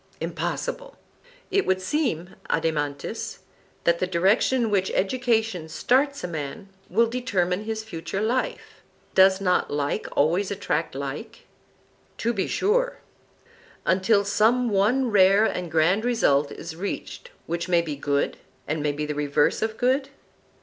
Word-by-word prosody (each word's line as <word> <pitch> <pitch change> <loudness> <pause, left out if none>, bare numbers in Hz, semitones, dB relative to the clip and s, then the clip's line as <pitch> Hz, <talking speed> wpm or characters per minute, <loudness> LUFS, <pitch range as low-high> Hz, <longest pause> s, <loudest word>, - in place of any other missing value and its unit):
Impossible. - - -4 0.6
It 395 0 +3
would 190 0 +2
seem, 185 - -2
Adeimantus, 145 -3 -2 0.5
that 170 0 +2
the 185 - 0
direction 195 +8 +2
in 225 - 0
which 190 -2 +1
education 220 -6 0
starts 270 - +1
a - - -1
man, 165 +5 -6 0.2
will 230 +6 +4
determine 210 -6 -1
his 220 0 -3
future 190 -2 -5
life. 235 +5 -2 0.3
Does 190 0 +6
not 180 -2 +1
like 145 0 -2
always 175 +7 +2
attract 170 -7 -2
like? 145 - -6 0.7
To 235 +1 0
be 195 -4 -1
sure. - - +1 0.9
Until 195 +2 +3
some 230 +4 +3
one 225 +6 +2
rare 195 +1 +5
and 180 -5 -2
grand 165 +7 +2
result 150 - +2
is 160 0 -7
reached 200 - -5 0.2
which 170 +1 -3
may 170 -1 +3
be 155 -3 -4
good, 140 0 -1 0.3
and 150 +1 -1
may 145 0 0
be 150 +1 -3
the 150 - -3
reverse 145 0 +1
of 220 0 -2
good? 265 +2 +1
195 Hz, 140 wpm, -25 LUFS, 165-230 Hz, 0.9 s, Does